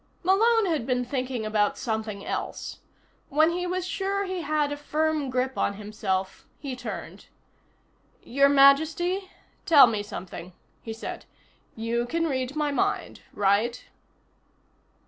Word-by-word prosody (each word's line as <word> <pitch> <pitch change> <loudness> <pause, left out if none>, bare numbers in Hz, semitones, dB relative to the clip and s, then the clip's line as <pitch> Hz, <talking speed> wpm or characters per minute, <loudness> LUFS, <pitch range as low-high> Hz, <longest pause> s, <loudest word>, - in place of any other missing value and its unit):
Malone 445 +5 +4
had 315 -9 -1
been 250 -1 0
thinking 255 -3 -3
about 215 -1 +1
something 220 -4 -3
else. - - -4 0.5
When 310 +3 +4
he 360 +1 -2
was 365 0 -2
sure 395 +1 -1
he 370 -2 -3
had 300 -1 0
a - - -1
firm 305 -1 -1
grip 255 +1 -1
on 200 - +1
himself 195 -2 -3
he 275 -3 -5
turned. 250 - -7 1.0
"Your 275 +3 +3
Majesty, 315 +7 +4 0.4
tell 295 -5 +9
me 220 -3 -1
something," 185 -3 -8 0.3
he 225 - -7
said. 225 - -7 0.5
"You 235 +2 -1
can 330 +5 0
read 260 -2 -2
my 300 -1 0
mind, 390 +8 -1
right?" 205 +5 +1
275 Hz, 130 wpm, -26 LUFS, 225-325 Hz, 1.0 s, tell